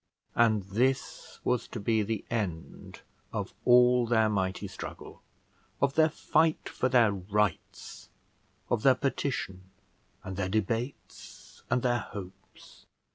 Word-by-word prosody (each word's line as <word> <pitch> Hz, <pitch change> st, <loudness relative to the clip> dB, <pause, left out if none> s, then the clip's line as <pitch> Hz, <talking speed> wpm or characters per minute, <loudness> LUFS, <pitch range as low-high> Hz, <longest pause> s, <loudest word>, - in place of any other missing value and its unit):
And 110 Hz, -3 st, +3 dB
this 120 Hz, +8 st, -1 dB
was 125 Hz, -1 st, 0 dB
to 115 Hz, -, -6 dB
be 110 Hz, +1 st, +1 dB
the 110 Hz, +1 st, -3 dB
end 95 Hz, -8 st, -4 dB, 0.3 s
of -, -, -4 dB
all 125 Hz, 0 st, +5 dB
their 110 Hz, -2 st, +3 dB
mighty 95 Hz, -3 st, -1 dB
struggle, -, -, -9 dB, 0.6 s
of 140 Hz, 0 st, +2 dB
their 160 Hz, +1 st, +4 dB
fight 155 Hz, +1 st, +1 dB
for 130 Hz, -, -1 dB
their 120 Hz, -4 st, +5 dB
rights, 100 Hz, -1 st, -3 dB, 0.6 s
of 120 Hz, -, +2 dB
their 130 Hz, +1 st, +5 dB
petition, 125 Hz, -9 st, -3 dB, 0.5 s
and 95 Hz, -1 st, -6 dB
their 95 Hz, -1 st, -1 dB
debates, 115 Hz, +6 st, -4 dB
and 125 Hz, 0 st, +1 dB
their 120 Hz, -1 st, +2 dB
hopes! 95 Hz, -2 st, -11 dB
115 Hz, 125 wpm, -29 LUFS, 100-125 Hz, 0.6 s, all